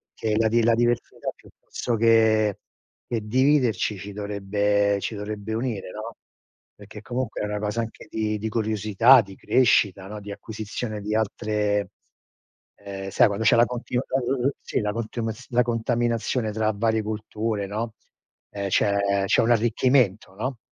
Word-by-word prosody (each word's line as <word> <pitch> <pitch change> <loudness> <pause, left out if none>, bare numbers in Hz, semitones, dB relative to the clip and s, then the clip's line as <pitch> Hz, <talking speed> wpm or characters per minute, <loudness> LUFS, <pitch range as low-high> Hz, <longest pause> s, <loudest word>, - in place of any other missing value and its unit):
che 110 -1 -1
la 110 0 +3
di 115 0 +3
la 115 0 +4
diversità 120 0 -1
piuttosto 120 - -5
che 110 -2 +4 0.5
che 115 -2 -2
dividerci 125 -5 +2
ci 100 +1 -8
dovrebbe 100 0 0
ci - - -3
dovrebbe 105 +1 -5
unire, 110 -6 -3
no, 110 +2 -7 0.6
perché 105 +1 -12
comunque 125 -2 -3
è - - -1
una 105 0 -3
cosa 105 +2 -1
anche 115 - -8
di 110 -1 -1
di 110 +1 -3
curiosità, 110 +3 +4
di 95 -1 -11
crescita, 100 -6 +2
no, 105 +1 -7
di 100 0 -8
acquisizione 110 +1 -5
di 105 +1 -3
altre 105 -2 0 0.9
ehm, 95 -1 -7
sai 105 - +5
quando 105 +2 -2
c'è 115 - +6
la 120 - +6
continu 125 0 -3
la 130 - 0
l 125 0 -1
l - - +2
sì, - - -1
la 105 0 -1
contiumaz 115 +1 -4
la 125 0 +3
contaminazione 115 -1 0
tra 110 0 0
varie 110 +1 +1
culture, 110 -1 -3
no 110 +2 -4 0.6
ehm, 100 -1 -3
c'è 100 0 +2
c'è - - +3
un 115 - +1
arricchimento, 115 -3 +2
no 125 +4 -3
110 Hz, 160 wpm, -24 LUFS, 105-115 Hz, 0.9 s, c'è